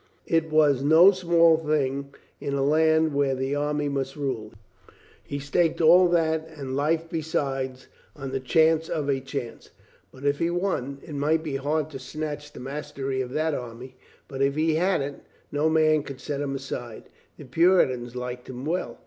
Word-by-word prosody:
It 165 -1 +1
was 150 -4 +3
no 160 +7 +7
small 170 -3 +4
thing 140 -3 -1 0.3
in 140 - -3
a 135 - 0
land 160 +1 +3
where 140 -1 +1
the 130 +1 -2
army 145 0 -1
must 135 -1 -3
rule. 130 -7 -3 0.7
He 140 - -5
staked 160 +4 0
all 175 +3 +7
that 160 -2 +1
and 140 -5 -6
life 160 +4 0
be 165 -1 -3
side 135 -4 -2 0.4
on 135 -2 -6
the 135 - -1
chance 160 +5 +2
of 150 -3 -2
a 135 -1 +1
chance. 135 -2 -7 0.4
But 130 +2 -11
if 145 0 +1
he 165 - +1
won! 175 -7 -2
It 155 - -9
might 155 +3 +1
be 145 -4 -3
hard 150 +3 -1
to 135 - -7
snatch 145 +2 -6
the - - -11
mastery 135 0 -4
of 125 - -4
that 155 0 0
army, 125 0 -7 0.3
but 135 -1 -6
if 140 0 +2
he 160 +1 +2
had 180 +1 +1
it, 140 0 -5 0.3
no 150 +2 +1
man 155 -1 +3
should 140 -3 -8
set 140 +1 -4
him 140 -1 -2
aside. 125 -4 -6 0.3
The - - -11
Puritans 130 -5 +2
liked 125 0 -6
him 130 +1 -7
well. 175 +4 -2
145 Hz, 185 wpm, -25 LUFS, 135-160 Hz, 0.7 s, no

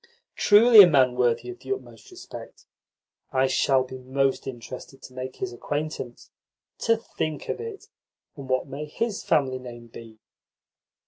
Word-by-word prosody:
"Truly 215 +1 +8
a 190 - +9
man 130 -6 +4
worthy 125 - +1
of 370 - -12
the - - -8
utmost 400 +1 -6
respect! 365 -1 -11 0.7
I 130 0 +2
shall 130 0 +2
be 130 0 -9
most 135 +1 -1
interested 130 +2 -8
to 130 - -12
make 130 0 -6
his 190 - -5
acquaintance. 145 -1 -5 0.5
To 230 -1 +2
think 155 -8 -5
of - - -2
it! 450 -3 -8 0.5
And 135 -2 -10
what 130 0 +1
may 140 +2 -6
his 210 +8 -3
family 130 -3 +1
name 120 -2 -11
be?" 115 -1 -12
135 Hz, 150 wpm, -25 LUFS, 130-190 Hz, 0.7 s, a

